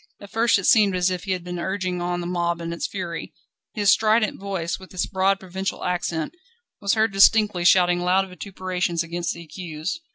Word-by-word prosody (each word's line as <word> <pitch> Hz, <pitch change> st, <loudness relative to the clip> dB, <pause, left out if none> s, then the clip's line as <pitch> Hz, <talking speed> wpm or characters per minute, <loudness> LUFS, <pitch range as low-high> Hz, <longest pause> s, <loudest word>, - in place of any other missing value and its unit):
At 200 Hz, -, -12 dB
first 225 Hz, -3 st, +3 dB
it 195 Hz, -, -4 dB
seemed 200 Hz, -1 st, +5 dB
as 180 Hz, +1 st, +2 dB
if 180 Hz, +1 st, -4 dB
he 190 Hz, -, 0 dB
had 180 Hz, -2 st, -4 dB
been 180 Hz, 0 st, -5 dB
urging 185 Hz, -1 st, -2 dB
on 175 Hz, 0 st, -2 dB
the -, -, -5 dB
mob 170 Hz, -1 st, -1 dB
in 170 Hz, 0 st, -4 dB
its 170 Hz, -, -3 dB
fury. 175 Hz, -4 st, -6 dB, 0.4 s
His 205 Hz, -3 st, +4 dB
strident 215 Hz, 0 st, +2 dB
voice, 190 Hz, -4 st, -3 dB
with 190 Hz, -, -14 dB
its 180 Hz, -, 0 dB
broad 195 Hz, 0 st, +1 dB
provincial 190 Hz, +1 st, -4 dB
accent, 175 Hz, -3 st, -2 dB, 0.5 s
was 200 Hz, +1 st, +1 dB
heard 220 Hz, -1 st, +2 dB
distinctly 200 Hz, -2 st, +4 dB
shouting 175 Hz, -1 st, +5 dB
loud 185 Hz, +2 st, +2 dB
vituperations 180 Hz, -2 st, -3 dB
against 170 Hz, +1 st, -3 dB
the 170 Hz, -, -9 dB
accused. 165 Hz, -, -5 dB
185 Hz, 195 wpm, -23 LUFS, 175-195 Hz, 0.5 s, seemed